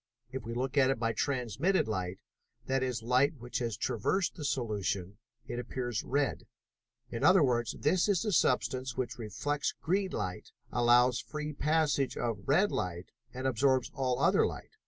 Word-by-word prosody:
If 130 0 -4
we 115 +1 -5
look 130 +3 0
at 130 -1 +5
it 135 - +1
by 115 0 0
transmitted 135 - 0
light, 95 -3 -2 0.5
that 135 0 0
is, 125 -3 -2
light 130 +6 +3
which 120 0 -4
has 115 -4 -2
traversed 175 - 0
the 150 - -8
solution, 105 -7 -2 0.3
it 120 - -4
appears 120 -2 -3
red. 140 0 -1 0.6
In 115 - -4
other 185 -3 +6
words, 120 -3 +1
this 180 +6 +2
is 200 0 +2
a 210 - 0
substance 130 - +1
which 125 -1 -3
reflects 145 +7 -2
green 190 +3 0
light, 90 - -4 0.2
allows 120 +1 +4
a - - -23
free 150 0 -4
passage 150 -2 +1
to 120 -1 0
red 140 - +2
light, 90 0 -3 0.2
and 130 +1 -6
absorbs 130 +1 +2
all 130 -2 0
other - - +4
light. - - -8
130 Hz, 170 wpm, -31 LUFS, 115-145 Hz, 0.6 s, other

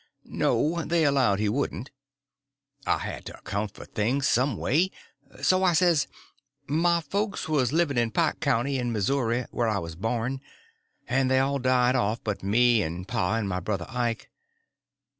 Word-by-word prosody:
_" - - -33 0.2
No, 165 +2 0
they 165 -1 +1
allowed 135 -8 +3
he 105 +1 0
wouldn't. 125 +1 -2 1.0
I - - +3
had - - -6
to - - -9
account 100 +1 -4
for - - -10
things 130 +6 0
some 130 -3 +2
way, 170 +8 +2 0.5
so 185 0 +3
I 180 -2 +4
says: 170 -3 +3 0.6
"My 170 +4 +2
folks 200 +7 -2
was 140 -6 +1
living 155 -5 +1
in 120 -1 +1
Pike - - 0
County, 135 0 0
in 120 -1 -1
Missouri, 120 +2 0
where 120 - 0
I 110 -2 +1
was 85 -3 -5
born, 115 +7 -2 0.7
and 130 +1 +1
they 130 - +3
all 135 +1 +1
died 125 0 +3
off 110 0 0
but 105 -2 -3
me 115 +3 +3
and 90 +1 -4
pa 90 +4 0
and 115 -3 -1
my 90 -1 -2
brother 95 -1 -3
Ike. 120 -3 -3
125 Hz, 170 wpm, -26 LUFS, 110-140 Hz, 1.0 s, I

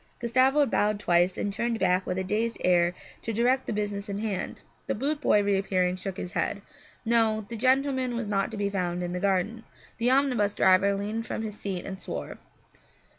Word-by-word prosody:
Gustavo 260 +5 +3
bowed 210 -4 +1
twice 175 -1 +2
and 205 - -2
turned 235 +2 -1
back 185 -2 +1
with 180 - -2
a 190 - -1
dazed 220 +4 -1
air 175 -1 +3 0.3
to 230 - -3
direct 245 +4 +1
the - - -1
business 205 -1 -3
in 200 - -3
hand. 210 -3 -4 0.2
The - - 0
boot 290 +6 -2
boy, 210 -7 +4
reappearing, 190 -2 +1
shook 190 0 -6
his 180 - -5
head. 200 +2 -2 0.4
No, 220 -2 +2
the 235 - -6
gentleman 260 +1 +1
was 235 -1 -2
not 200 -1 0
to 220 - -7
be 205 0 0
found 180 -2 -2
in 175 0 -3
the 180 - -2
garden. 200 +4 0 0.4
The 235 +2 +2
omnibus 255 -6 +2
driver 190 +2 +4
leaned 215 +3 -3
from 220 - -3
his 215 -1 -4
seat 190 -3 -4
and 190 0 -7
swore. 70 - -6
205 Hz, 195 wpm, -27 LUFS, 190-235 Hz, 0.4 s, boy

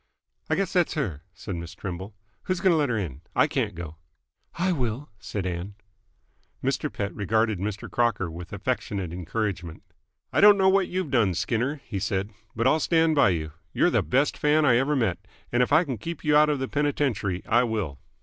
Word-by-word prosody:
"I - - +2
guess 195 -3 -1
that's 180 -3 +2
her," 95 - -2
said 95 -1 -6
Miss 85 +1 -7
Trimble. 95 +3 -6 0.3
"Who's 185 -1 -1
going 190 0 +4
to - - +4
let 145 -3 +1
'r 115 - 0
in? 80 -9 -4
I - - +5
can't - - -1
go." 80 -2 -7 0.6
"I 185 +2 +1
will," 130 -3 -2
said 100 -3 -4
Ann. 90 +3 -4 0.9
Mr. - - -1
Pett 100 0 -3
regarded 110 0 +1
Mr. 105 +1 -4
Crocker 115 -8 0
with 85 +1 -9
affectionate 100 -4 -3
encouragement. 90 -1 -3 0.5
"I - - +3
don't 205 0 +8
know 190 -1 +4
what 195 -1 +3
you've 180 -5 -3
done, 110 -9 +3
Skinner," 130 - -1
he 100 - -4
said, 95 +2 -2 0.2
"but 115 +1 0
I'll 155 +4 +4
stand 165 0 +3
by 140 -9 +5
you. 80 -4 -2 0.2
You're - - +3
the - - +3
best 135 +4 +1
fan 150 +1 +3
I 120 -4 +5
ever 140 +4 +1
met, 105 -9 0 0.3
and 120 - +2
if 125 - +1
I 160 +4 +6
can 130 - -4
keep 165 +7 -6
you 150 -1 +3
out 150 0 +6
of 150 - +1
the 130 0 -2
penitentiary, 130 -11 -1
I 120 +2 +4
will." 105 - -2
115 Hz, 200 wpm, -26 LUFS, 95-150 Hz, 0.9 s, don't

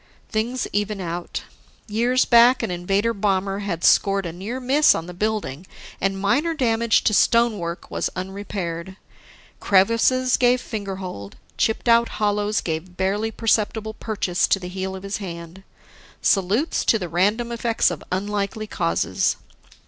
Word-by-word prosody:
Things 235 +3 -1
even 205 0 -1
out. 175 -1 -5 0.4
Years 240 +4 +2
back, 240 +1 +5
an - - -2
Invader 195 +6 0
bomber 195 -1 0
had 180 -5 -4
scored 195 -1 +4
a 165 - -5
near 205 +9 -5
miss 275 +4 +4
on 165 - -4
the 180 - -8
building, 185 -5 -3 0.3
and 195 0 0
minor 290 +12 +1
damage 230 -4 +2
to 215 - +2
stonework 205 -7 +1
was - - -1
unrepaired. 190 -2 -5 0.6
Crevices 230 +6 +3
gave 250 0 +3
fingerhold, 190 - -6 0.2
chipped 220 +2 0
out 235 0 +5
hollows 210 0 0
gave 170 +2 -5
barely 200 +4 0
perceptible 220 -1 0
purchase 205 -5 -1
to - - +3
the 180 -1 -7
heel 190 +1 -4
of 190 - -9
his 200 +1 -3
hand. 170 -2 -8 0.6
Salutes 205 - +1
to 225 - +4
the 180 -4 -4
random 205 +8 0
effects 230 -4 +1
of 170 - -6
unlikely 205 +2 -2
causes! 85 - 0
205 Hz, 140 wpm, -22 LUFS, 185-230 Hz, 0.6 s, back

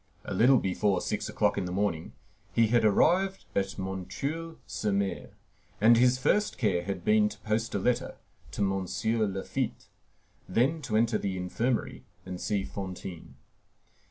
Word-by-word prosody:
A - - -4
little 125 +8 +5
before 95 -1 +1
six - - -3
o'clock - - +1
in 95 - -2
the 90 - -4
morning 90 -4 -1 0.4
he 115 -2 +3
had 120 0 +3
arrived 180 - +3
at 95 0 -1
M. 95 -1 -4
sur 165 +3 -4 0.3
M., 100 -1 -1 0.5
and 115 +3 +7
his 125 +2 +4
first 210 +11 +1
care 90 -7 +1
had 95 -2 -4
been 105 0 +4
to 105 - -10
post 110 +1 -1
a - - +3
letter 120 +5 0 0.4
to - - -3
M. 95 -1 0 0.4
Laffitte, 95 0 -3 0.6
then 135 - +2
to 115 -6 0
enter 115 -1 +2
the 95 -2 -2
infirmary 115 +7 -2 0.2
and 90 -1 -6
see 100 -2 0
Fantine. 95 -3 -7
105 Hz, 155 wpm, -29 LUFS, 95-120 Hz, 0.6 s, and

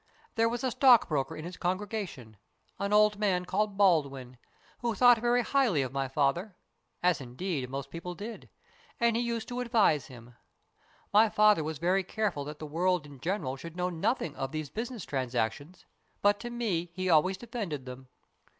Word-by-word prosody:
There 230 0 +2
was 240 +1 -4
a 260 - 0
stockbroker 215 - +4
in 155 - -7
his 180 +1 -7
congrega 200 +3 -2
tion, 115 -9 -13 0.4
an 200 0 -2
old 210 0 +4
man 185 -4 +1
called 200 +2 -1
Baldwin, 140 -10 +1 0.4
who 235 -2 -1
thought 245 +1 +6
very 240 +1 +2
BURDON'S - - -10
TOMB - - -12
97 275 -2 +5
highly 155 -8 +1
of 130 0 -5
my 135 -1 -1
father 150 +9 0 0.5
as, 180 -5 +3
indeed, 130 +1 -4
most 140 +1 -5
people 175 +1 -6
did 220 +4 -8 0.5
and 235 -1 +3
he 235 - +1
used 235 -2 -2
to 245 0 -4
advise 225 - +2
him. 120 -1 -13 0.8
My 215 +2 +6
father 210 -5 +4
was 155 0 -4
very 180 +5 +1
careful 200 -6 -2
that 150 +1 -7
the 155 - -7
world 175 +2 0
in 145 -2 -13
general 160 -4 -2
should 165 +5 -9
know 180 0 -1
nothing 170 - -1
of 135 0 -4
these 155 -2 -5
business 230 -2 -5
transactions, 130 +5 -3 0.4
but 205 0 +4
to 240 - -6
me 205 -8 -2
he 185 0 -2
always 180 +3 +3
defended 205 - -5
them. 130 +1 -9
180 Hz, 185 wpm, -29 LUFS, 145-215 Hz, 0.8 s, thought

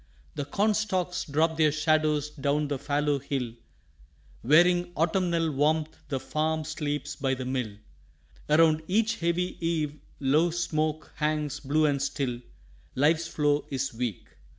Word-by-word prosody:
The 145 -2 -4
corn 205 +9 +1
stalks 185 -4 -1
drop 160 +2 +1
their 155 -2 +4
shadows 150 -1 +1
down 145 0 -1
the 140 -2 -2
fallow 145 0 0
hill; 130 -4 -3 0.9
Wearing 175 +6 +4
autumnal 170 -1 +1
warmth 155 +2 +1
the 135 -3 -1
farm 155 +3 -1
sleeps 145 -2 -3
by 135 -2 0
the 130 0 -5
mill, 125 -5 -2 0.7
Around 155 0 +5
each 225 +4 +1
heavy 170 +1 -1
eave 160 -3 0 0.3
low 150 +5 +3
smoke 155 -2 -2
hangs 150 -1 -1
blue 155 +2 +1
and 140 -2 +1
still 135 -3 -2 0.5
Life's 160 +4 +2
flow 145 -2 +1
is 135 -1 -2
weak. 115 -4 -3
150 Hz, 135 wpm, -27 LUFS, 140-165 Hz, 0.9 s, Around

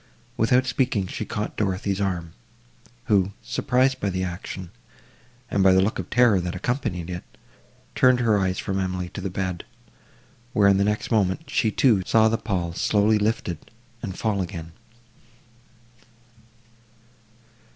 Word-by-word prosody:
Without 125 +3 +3
speaking, 125 -5 0
she 105 - -5
caught 105 -1 -4
Dorothée's 100 0 -1
arm, 90 -4 -2 0.7
who, 100 -4 +2
surprised 130 +1 +1
by 100 - -1
the 95 0 -2
action, 90 0 -6 0.8
and 100 - +2
by 95 -1 +6
the 95 - +5
look 100 +3 +1
of 95 - -5
terror 120 -6 +4
that 90 0 -4
accompanied 95 -5 -2
it, 90 -1 -5 0.7
turned 130 -1 +4
her 110 -4 +3
eyes 95 -1 0
from 95 0 -2
Emily 90 -1 -2
to 100 - -7
the 95 - -3
bed, 90 -1 -3 0.9
where, 105 -2 +4
in 100 -1 +5
the 100 - +3
next 105 +3 -1
moment 110 - +1
she, 115 -5 +1
too, 110 -2 +3
saw 110 +3 +4
the 110 +1 0
pall 90 -5 -2
slowly 105 +4 +2
lifted, 105 -6 -1 0.4
and 95 -5 -5
fall 105 -3 0
again. 85 -3 -6
100 Hz, 145 wpm, -24 LUFS, 95-110 Hz, 0.9 s, by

